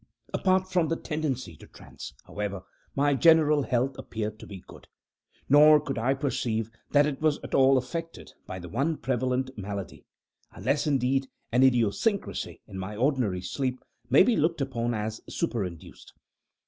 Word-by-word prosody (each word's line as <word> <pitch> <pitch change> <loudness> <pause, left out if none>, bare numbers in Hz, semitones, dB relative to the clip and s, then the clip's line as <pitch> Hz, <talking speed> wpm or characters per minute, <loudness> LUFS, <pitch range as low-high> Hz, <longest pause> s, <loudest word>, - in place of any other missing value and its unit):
Apart 185 0 +2
from 175 -3 +2
the 165 - 0
tendency 145 - -3
to - - -14
trance, - - -11
however, 100 -2 -4 0.3
my 145 +1 +3
general 155 0 +5
health 130 0 0
appeared 110 -1 -5
to - - -11
be 95 -3 -10
good; - - -14 0.6
nor 150 +2 +7
could 140 -4 -4
I 130 +4 +1
perceive 115 -5 -2 0.2
that 145 0 +4
it 145 -2 -3
was 155 -2 +2
at - - -8
all 135 0 +5
affected 165 +6 -5
by 95 - -6
the 90 -1 -8
one 140 - -1
prevalent 130 +1 -1
malady 100 -2 -7 0.5
unless, 145 +2 -1
indeed, 135 -1 +1 0.2
an 125 +2 +3
idiosyncrasy 130 - +1
in 95 - -8
my 100 +3 -5
ordinary 120 -7 0
sleep 130 +7 -2 0.3
may 135 +8 +7
be 235 +3 +2
looked 165 -1 +1
upon 120 -4 -1
as 110 +1 -4
superinduced. 95 - -4
130 Hz, 155 wpm, -27 LUFS, 110-150 Hz, 0.6 s, nor